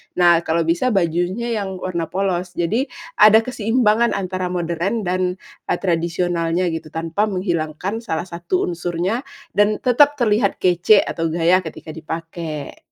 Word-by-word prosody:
nah 175 Hz, -2 st, +5 dB
kalau 165 Hz, +1 st, +1 dB
bisa 175 Hz, +10 st, +1 dB
bajunya 175 Hz, +6 st, 0 dB
yang 190 Hz, -2 st, -4 dB
warna 170 Hz, -3 st, -2 dB
polos. 185 Hz, -2 st, -1 dB
Jadi, 215 Hz, +10 st, +1 dB, 0.3 s
ada 215 Hz, +1 st, +8 dB
keseimbangan 230 Hz, -1 st, +1 dB
antara 185 Hz, -1 st, -2 dB
modern 175 Hz, +5 st, -1 dB
dan, 185 Hz, +1 st, 0 dB, 0.4 s
e -, -, 0 dB
tradisionalnya 170 Hz, 0 st, 0 dB
gitu, 160 Hz, -2 st, -6 dB
tanpa 165 Hz, +5 st, -1 dB
menghilangkan 180 Hz, -1 st, -2 dB
salah 170 Hz, -4 st, -3 dB
satu 170 Hz, +2 st, -2 dB
unsurnya 175 Hz, +7 st, -2 dB, 0.3 s
dan 205 Hz, +1 st, +3 dB
tetep 280 Hz, +4 st, +4 dB
terlihat 215 Hz, -3 st, +2 dB
kece 180 Hz, +3 st, +5 dB
atau 165 Hz, -1 st, -2 dB
gaya 170 Hz, +2 st, +3 dB
ketika 160 Hz, -, -9 dB
dipakai. 160 Hz, -2 st, -6 dB
180 Hz, 135 wpm, -20 LUFS, 165-205 Hz, 0.4 s, ada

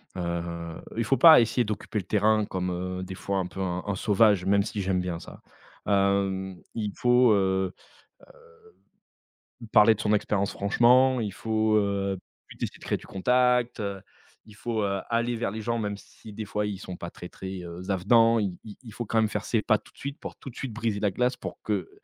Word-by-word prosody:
heu, 85 Hz, -1 st, -4 dB
il 115 Hz, -, 0 dB
faut 135 Hz, +4 st, +2 dB
pas 160 Hz, +1 st, +9 dB
essayer 115 Hz, +1 st, +1 dB
d'occuper 105 Hz, +1 st, -3 dB
le 95 Hz, -, -7 dB
terrain 110 Hz, +1 st, +2 dB
comme, 90 Hz, -2 st, -3 dB
heu, 90 Hz, +1 st, -4 dB
des 95 Hz, 0 st, -7 dB
fois 100 Hz, +1 st, -2 dB
un 95 Hz, -, -1 dB
peu 90 Hz, -, -10 dB
un 90 Hz, -1 st, -2 dB
un 100 Hz, -1 st, -2 dB
sauvage, 100 Hz, -2 st, +3 dB
même 100 Hz, +1 st, +3 dB
si 105 Hz, 0 st, -4 dB
j'aime 95 Hz, -1 st, 0 dB
bien 90 Hz, -2 st, -3 dB
ça, -, -, -12 dB, 0.4 s
hem, 100 Hz, -1 st, +1 dB, 0.2 s
il 105 Hz, -3 st, -3 dB
faut, 125 Hz, -1 st, +4 dB
heu 95 Hz, -2 st, +1 dB, 1.9 s
heu, -, -, -8 dB
parler 110 Hz, +1 st, +6 dB
de -, -, -6 dB
son 105 Hz, -, 0 dB
expérience 100 Hz, -1 st, 0 dB
franchement. 125 Hz, +5 st, +4 dB
Il 105 Hz, -2 st, -2 dB
faut, 110 Hz, +1 st, +1 dB
heu 100 Hz, -1 st, 0 dB, 0.3 s
puis -, -, -14 dB
tu -, -, -1 dB
essaies -, -, -10 dB
de -, -, -16 dB
créer -, -, -1 dB
du -, -, -15 dB
contact, 125 Hz, +4 st, +2 dB
heu, 100 Hz, -2 st, -4 dB, 0.4 s
Il 105 Hz, -, -15 dB
faut, 110 Hz, 0 st, -2 dB
heu, 100 Hz, -1 st, -1 dB
aller 120 Hz, +1 st, 0 dB
vers 115 Hz, -3 st, -2 dB
les 110 Hz, -, -5 dB
gens 115 Hz, +2 st, -1 dB
même 105 Hz, -2 st, -3 dB
si 110 Hz, -, -14 dB
des 110 Hz, +1 st, -6 dB
fois 105 Hz, +1 st, -2 dB
ils 100 Hz, -2 st, -4 dB
sont 95 Hz, -2 st, -7 dB
pas 85 Hz, -, -7 dB
très, 90 Hz, -, -10 dB
très, 95 Hz, +1 st, -7 dB
heu, 85 Hz, 0 st, -8 dB
z 95 Hz, -, -10 dB
avenants. 115 Hz, +5 st, +4 dB
Il 100 Hz, -4 st, -2 dB
il 105 Hz, -2 st, -11 dB
il 115 Hz, -4 st, -11 dB
faut 120 Hz, -, -4 dB
quand 115 Hz, -, -1 dB
même 110 Hz, -1 st, +4 dB
faire -, -, -3 dB
ses 115 Hz, -, 0 dB
pas 110 Hz, -, +3 dB
tout -, -, -20 dB
de -, -, -30 dB
suite 140 Hz, +1 st, -6 dB
pour -, -, -8 dB
tout -, -, -9 dB
de -, -, -21 dB
suite 130 Hz, -, -5 dB
briser 110 Hz, -2 st, -2 dB
la 105 Hz, -, +2 dB
glace 125 Hz, +5 st, 0 dB
pour -, -, -7 dB
que, 100 Hz, -5 st, -2 dB
105 Hz, 225 wpm, -27 LUFS, 95-115 Hz, 1.9 s, pas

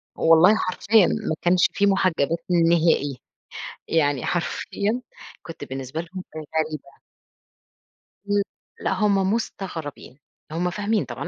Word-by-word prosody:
والله 165 Hz, +6 st, +6 dB
حرفيًا 205 Hz, 0 st, +3 dB
ما 160 Hz, -, -1 dB
كانش 175 Hz, 0 st, +4 dB
فيه 200 Hz, -, +2 dB
مُحجّبات 170 Hz, -5 st, +2 dB, 0.3 s
نهائي، 160 Hz, -5 st, +2 dB, 0.7 s
يعني 145 Hz, -5 st, +1 dB
حرفيًا 205 Hz, +6 st, -1 dB, 0.4 s
كنت 165 Hz, -, -9 dB
بالنسبة 135 Hz, +4 st, -5 dB
لهم 185 Hz, +2 st, -8 dB
غريبة. 155 Hz, -2 st, -4 dB, 1.3 s
إمم. 205 Hz, 0 st, +3 dB, 0.4 s
لأ -, -, 0 dB
هم 195 Hz, 0 st, +2 dB
مستغربين، 165 Hz, -, -5 dB, 0.3 s
هم 175 Hz, +3 st, 0 dB
فاهمين 205 Hz, +3 st, 0 dB
طبعًا، -, -, -6 dB
170 Hz, 105 wpm, -24 LUFS, 155-195 Hz, 1.3 s, والله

